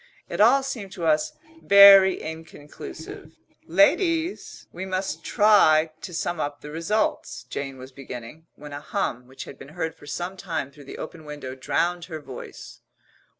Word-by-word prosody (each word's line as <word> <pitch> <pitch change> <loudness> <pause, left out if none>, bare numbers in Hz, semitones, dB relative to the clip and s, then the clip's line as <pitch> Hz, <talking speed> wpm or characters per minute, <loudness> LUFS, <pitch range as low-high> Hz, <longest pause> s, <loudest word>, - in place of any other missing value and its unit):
It - - -1
all 275 0 +6
seemed 230 -8 -5
to 170 - -5
us 155 -1 +2 0.3
very 200 -1 +8
inconclusive. 160 0 -9 0.3
"Ladies, 330 - +1
we 185 - -6
must 190 0 -3
try 165 -8 +4
to - - -7
sum 175 0 -3
up 145 -1 -3
the 150 - -9
results," 170 - -1
Jane 135 -1 -5
was 130 +1 -11
beginning, 130 +4 -10
when 150 0 -11
a 145 - -6
hum, 145 -7 -3
which 130 +1 -9
had - - -12
been - - -11
heard 160 -2 -2
for 145 - -17
some 175 +5 -4
time 165 -7 -4
through 145 0 -15
the - - -9
open 160 0 -8
window, 145 -3 -7
drowned 170 +6 -1
her 160 -3 -7
voice. 135 -4 -10
160 Hz, 160 wpm, -24 LUFS, 145-190 Hz, 0.3 s, very